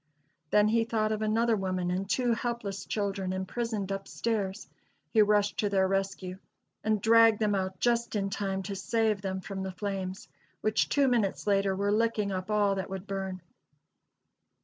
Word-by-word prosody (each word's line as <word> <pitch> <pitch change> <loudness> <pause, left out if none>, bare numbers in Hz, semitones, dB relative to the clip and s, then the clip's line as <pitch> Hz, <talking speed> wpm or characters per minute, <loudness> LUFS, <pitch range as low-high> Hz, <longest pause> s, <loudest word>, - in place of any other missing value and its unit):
Then 210 +3 +4
he 230 +1 +3
thought 220 -2 0
of 215 0 -1
another 225 +2 +2
woman 185 -3 -1
and 190 +2 -2
two 245 +1 +2
helpless 230 -4 -3
children 195 -3 -2
imprisoned 200 +1 -3
up 195 0 -4
stairs. 205 -5 -2 0.4
He 220 - +5
rushed 205 0 +2
to 205 - +2
their 190 -1 +3
rescue, 190 -1 -2 0.4
and 215 -1 +1
dragged 225 +1 +6
them 210 -1 +1
out 190 -1 -2
just 235 -1 +1
in 195 -1 -1
time 195 -1 -2
to 200 +1 -4
save 220 0 0
them 190 -1 -3
from 190 0 -5
the 190 0 -3
flames, 190 -1 -4 0.3
which 215 0 +1
two 280 -1 +3
minutes 230 -6 +1
later 195 -1 +2
were 200 +1 0
licking 215 -2 +1
up 185 +1 -4
all 205 -2 +3
that 190 -1 -3
would 190 0 -5
burn. 190 -2 -4
200 Hz, 170 wpm, -29 LUFS, 190-220 Hz, 0.4 s, dragged